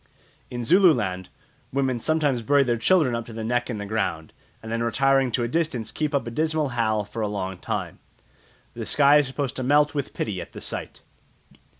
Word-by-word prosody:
In 120 -1 -4
Zululand 120 - +3 0.4
women 130 -2 0
sometimes 145 -3 +1
bury 140 +4 +3
their 120 -3 +1
children 145 +2 +3
up 115 -1 -3
to 115 - -9
the 110 0 -5
neck 120 +2 -1
in 115 - -3
the 105 - -5
ground, 100 -7 -2 0.3
and 110 - -7
then 115 0 -1
retiring 135 +2 +2
to 120 - +1
a - - 0
distance 125 -6 -1
keep 150 -1 -2
up 140 - 0
a 115 - -5
dismal 155 +2 0
howl 110 -3 0
for 110 +2 -6
a 105 - 0
long 95 -3 -4
time. - - -4 0.7
The - - -6
sky 145 0 +5
is 145 -2 +2
supposed 135 0 -3
to - - -2
melt 145 +3 +3
with 140 -2 -4
pity 95 -5 -3
at - - -11
the - - -8
sight. - - -6
125 Hz, 205 wpm, -24 LUFS, 110-145 Hz, 0.7 s, sky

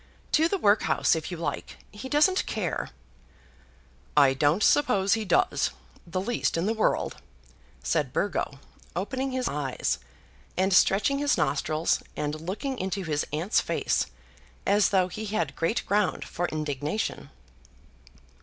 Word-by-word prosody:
"To 315 +2 +4
the 395 - 0
workhouse, 205 - +3
if 160 -1 -4
you 175 - -5
like. 165 - -4
He 210 +5 -8
doesn't 310 +7 +3
care." - - -2 1.3
"I 140 -2 +7
don't 150 +8 +2
suppose 205 -9 +4
he 220 -1 0
does; 175 -2 +2 0.4
the 180 +2 -2
least 215 -2 -1
in 165 - 0
the 220 - +1
world," 220 - 0 0.7
said - - 0
Burgo, - - -1 0.4
opening 265 +1 -2
his 255 -1 -1
eyes, 140 -3 -1 0.6
and 190 +1 +2
stretching 205 +9 +4
his 290 0 +2
nostrils, 155 +3 +1
and 150 +1 -3
looking 230 - -4
into 190 +1 -2
his 150 -3 -1
aunt's 165 +8 +1
face - - 0 0.6
as 200 -1 +4
though 190 -3 +3
he 215 +4 -6
had 215 +1 -2
great 165 +8 0
ground 205 -1 +1
for 175 - -2
indignation. 150 - -3
190 Hz, 135 wpm, -27 LUFS, 155-220 Hz, 1.3 s, I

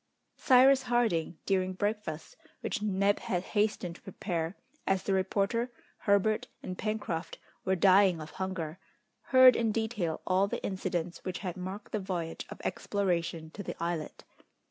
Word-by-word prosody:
Cyrus 265 +1 +6
Harding, 230 -10 +1
during 185 -1 +1
breakfast, 205 -5 -3 0.3
which - - -2
Neb 200 -1 +2
had 180 -1 -2
hastened 205 -5 0
to - - -24
prepare, 175 -3 -3 0.3
as 195 -1 +2
the 195 - 0
reporter, 200 +5 0 0.3
Herbert, 205 +1 +2 0.2
and 185 - -4
Pencroft 195 -6 -3 0.3
were 190 0 +2
dying 190 -1 +5
of 155 0 -8
hunger, 185 -4 -4 0.5
heard 255 -1 +8
in 225 -2 +1
detail 210 -7 -1
all 190 +2 +3
the - - -4
incidents 180 -3 -3
which 185 -1 -3
had 180 - -3
marked 190 +2 -6
the 215 - -1
voyage 175 -4 -4
of - - -9
exploration 170 -5 -1
to 200 - -7
the 195 - -5
islet. 170 -2 -3
190 Hz, 145 wpm, -30 LUFS, 175-210 Hz, 0.5 s, heard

